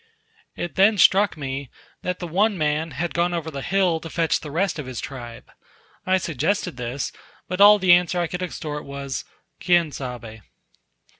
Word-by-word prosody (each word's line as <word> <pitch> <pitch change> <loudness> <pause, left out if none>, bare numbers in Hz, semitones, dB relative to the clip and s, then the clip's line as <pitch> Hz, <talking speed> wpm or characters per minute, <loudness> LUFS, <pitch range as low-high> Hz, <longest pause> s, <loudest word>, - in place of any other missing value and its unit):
It 175 - -4
then 205 +3 +5
struck 195 0 +5
me, 135 -2 -5 0.3
that 180 0 -2
the 175 - -6
one 200 +5 +2
man 155 +1 0
had 160 +4 -3
gone 175 +1 +1
over 160 -1 -4
the 140 -2 -5
hill 185 -1 +1
to 165 - -8
fetch 165 -1 +1
the 150 - -8
rest 165 +1 -1
of 140 - -5
his 130 -2 -5
tribe. 120 -4 -8 0.6
I 185 0 +4
suggested 165 +1 -1
this; 125 +2 -3 0.4
but 185 +2 -2
all 210 +1 +9
the 185 -3 +5
answer 175 0 +3
I 175 - +1
could 180 +3 -5
extort 155 -4 -5
was, 140 -1 -5 0.4
"Quien 175 -3 +3
sabe?" 120 -5 -7
165 Hz, 175 wpm, -23 LUFS, 140-180 Hz, 0.6 s, all